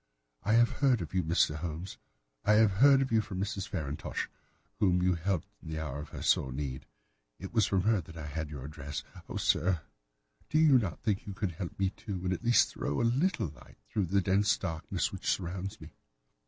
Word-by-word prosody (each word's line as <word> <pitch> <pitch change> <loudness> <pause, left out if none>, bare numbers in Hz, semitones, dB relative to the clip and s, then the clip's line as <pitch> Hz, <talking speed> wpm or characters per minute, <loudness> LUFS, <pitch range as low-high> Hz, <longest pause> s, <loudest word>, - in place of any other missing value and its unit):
I 105 - +1
have 120 +1 +5
heard 130 -4 +4
of 80 - -9
you, 95 - +2
Mr. 80 -1 +2
Holmes; 85 +3 -5 0.4
I 105 - +4
have 110 -1 +5
heard 135 -1 +7
of 130 - -5
you 110 -1 +4
from 100 -4 -6
Mrs. 100 -1 -2
Farintosh, 75 -5 -3 0.5
whom 90 -4 +3
you 90 0 +4
helped 85 0 -1
in - - -9
the 80 - -3
hour 75 -3 -4
of 75 0 -7
her - - -7
sore 65 - +3
need. 65 -1 -4 0.5
It 95 - -8
was 110 -4 +4
from 95 -1 +2
her 110 -2 +3
that 80 0 -12
I 80 - -6
had 75 +1 -4
your 70 -3 -7
address. 70 -1 -6 0.3
Oh, - - -3
sir, 90 -2 +2 0.7
do 155 - +2
you 150 -5 +6
not 95 -8 -3
think 100 -3 +1
that - - -23
you 100 - -4
could 95 -2 -1
help 85 +1 -6
me, 95 -1 +1
too, 100 -2 -6
and 95 0 +1
at 95 - -5
least 120 0 +5
throw 70 - -2
a - - +2
little 135 - +1
light 70 -3 -16 0.2
through 100 -4 +1
the 100 +3 +2
dense 100 +3 +3
darkness 80 -4 -2
which - - -3
surrounds 95 +3 -2
me? 80 0 -12
95 Hz, 220 wpm, -31 LUFS, 80-105 Hz, 0.7 s, heard